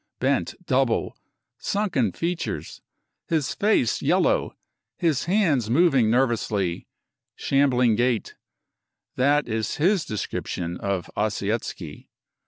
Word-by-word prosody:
Bent - - 0
double, - - +1 0.4
sunken 170 - 0
features, 170 - -4 0.5
his 155 -5 0
face 205 - +1
yellow, - - +1 0.4
his 160 -6 +1
hands 165 - +2
moving 135 -4 +4
nervously, 110 -7 0 0.5
shambling 125 -4 +2
gait— 120 -2 0 0.8
that 145 +2 +2
is 110 -2 -2
his 185 +4 +2
description 90 -4 -4
of 100 -3 -2
Ossietzky. 105 -6 -3
125 Hz, 90 wpm, -24 LUFS, 105-160 Hz, 0.8 s, moving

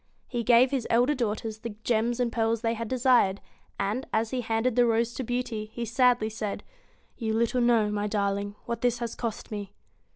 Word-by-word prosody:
He 240 -2 -2
gave 245 +3 +5
his 265 -4 -1
elder 245 +5 +3
daughters 220 -3 -3
the 225 -2 -6
gems 235 +1 +1
and 245 -1 +1
pearls 225 -1 0
they 230 -1 +1
had 230 0 -4
desired, 245 -6 +3 0.4
and, 205 +6 -1
as 220 0 0
he 255 -1 -1
handed 225 +1 0
the 245 -1 +4
rose 230 +1 +1
to 260 - -4
Beauty, 235 -3 -3
he 235 - -3
sadly 240 -1 +3
said, 220 -2 -4 0.5
'You 220 -1 -2
little 235 +2 +1
know, 230 -3 +3
my 210 0 -1
darling, 200 -1 -1
what 235 - -4
this 245 -1 +2
has 235 -1 -4
cost 230 -2 -5
me.' 205 -2 -5
230 Hz, 195 wpm, -27 LUFS, 215-245 Hz, 0.5 s, gave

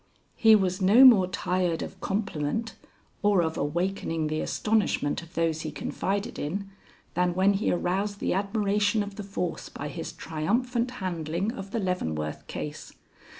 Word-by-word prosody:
He 220 -1 +7
was 185 -2 +1
no 215 +8 +7
more 205 -8 +8
tired 180 -2 -1
of - - -9
compliment 195 +1 -2 0.5
or 205 -4 +4
of 160 0 -2
awakening 165 +1 -1
the 155 +1 -1
astonishment 210 -9 0
of 170 +1 -15
those 165 -1 0
he 155 - -4
confided 195 +6 -3
in, 195 +6 -3 0.4
than 180 0 +1
when 190 +2 +4
he 200 +2 +1
aroused 195 +4 -1
the - - 0
admiration 205 +2 +1
of 205 0 -7
the 210 - -6
force 190 -3 -4
by - - -6
his - - -5
triumphant 235 +10 -1 0.2
handling 170 +3 -2
of 195 -5 -7
the 220 - -3
Leavenworth 80 - -2
Case. - - -6
190 Hz, 150 wpm, -27 LUFS, 165-205 Hz, 0.5 s, more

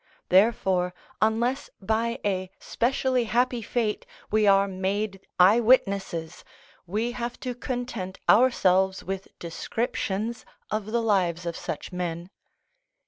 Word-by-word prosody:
Therefore, 185 -3 +3 0.3
unless 235 +5 +1
by 225 +4 -1
a 185 -2 -1
specially 255 0 0
happy 245 +2 +1
fate 220 -1 -2 0.2
we 215 -1 +3
are 195 0 +5
made 195 +1 -2 0.2
eye 195 +6 +7
witnesses, 195 -8 +1 0.4
we 220 +6 -1
have 240 0 -5
to 250 -1 -3
content 245 -6 -4
ourselves 190 -6 +4
with 195 0 -4
descriptions 215 +4 -3 0.3
of 215 -1 -2
the 235 0 +1
lives 180 -5 +1
of 170 -1 -3
such - - -5
men. 175 0 -4
210 Hz, 115 wpm, -26 LUFS, 185-235 Hz, 0.4 s, eye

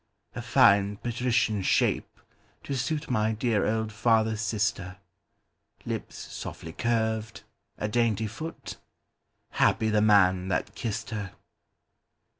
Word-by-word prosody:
A - - -5
fine 100 0 +4
patrician 120 -2 0
shape, - - 0 0.4
to 140 - -4
suitMy 125 -6 -1
dear 110 -3 +1
old 110 0 -1
father's 110 -1 +2
sister—Lips 95 -3 -5
softly - - -8
curved, 110 -1 -1 0.3
a 105 - -2
dainty 110 -1 +1
foot; 120 +10 -7 0.7
Happy 110 - +2
the 105 0 +3
man 95 -3 +4
that 90 -5 -2
kissed 115 +1 -4
her! 105 -4 -5
110 Hz, 100 wpm, -27 LUFS, 100-115 Hz, 0.7 s, fine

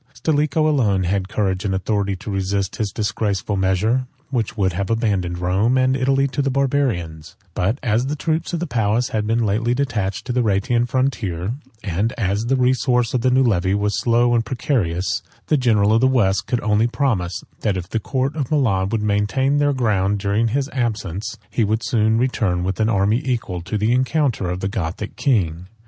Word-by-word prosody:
Stilicho 155 0 +1
alone 115 -11 +2
34 90 - -1
had 100 -1 -1
courage 95 -3 -1
and 95 -2 -1
authority 100 0 -1
to 100 - -7
resist 95 0 -1
his 105 -3 -2
disgraceful 105 -2 -1
measure, 100 +7 +1 0.2
which 115 -4 -2
would 95 -3 +1
have 95 +2 -2
abandoned 100 -6 0
Rome 95 +8 +1
and 130 0 +3
Italy 135 +1 +2
to 145 - -1
the 135 - 0
Barbarians; 110 - -1 0.2
but 95 +8 0
as 120 +1 +1
the 145 - -2
troops 160 +2 -1
of 170 - -2
the 175 - -2
palace 120 -2 0
had 105 -1 -2
been 115 +1 +1
lately 115 +4 +1
detached 110 -8 -2
to 125 - -2
the 125 - +2
Rhaetian 115 +3 +1
frontier, 115 -8 -1 0.3
and 100 +5 -1
as 105 0 -1
the 135 +3 +2
resource 125 -2 +2
of 125 -2 0
new 130 +1 +4
levies 95 -5 +2
was 105 -1 0
slow 120 0 +3
and 115 -1 +2
precarious, 105 - -1 0.3
the - - +4
general 110 -5 +3
of 115 - +3
the 130 - +5
West 100 -8 +2
could 120 - 0
only 105 +2 +2
promise, 115 -8 -1 0.2
that 100 -3 0
if 90 -1 -5
the 110 - -2
court 135 +5 -2
of 140 -6 -2
Milan 110 -11 +1
would 110 0 -1
maintain 105 +7 +1
their 145 0 +3
ground 105 -6 +1
during 100 +3 +1
his 135 +4 0
absence, 110 - -3
he 115 - +1
would 110 +2 0
soon 110 -1 +2
return 110 -8 0
with 95 +2 -2
an 110 0 +2
army 105 +3 +2
equal 115 -9 -2
to 105 +5 -3
the 105 +2 +1
encounter 130 - +1
of 90 +1 -3
the 95 - -1
Gothic 95 0 -4
king. 90 - 0
110 Hz, 195 wpm, -21 LUFS, 95-130 Hz, 0.3 s, the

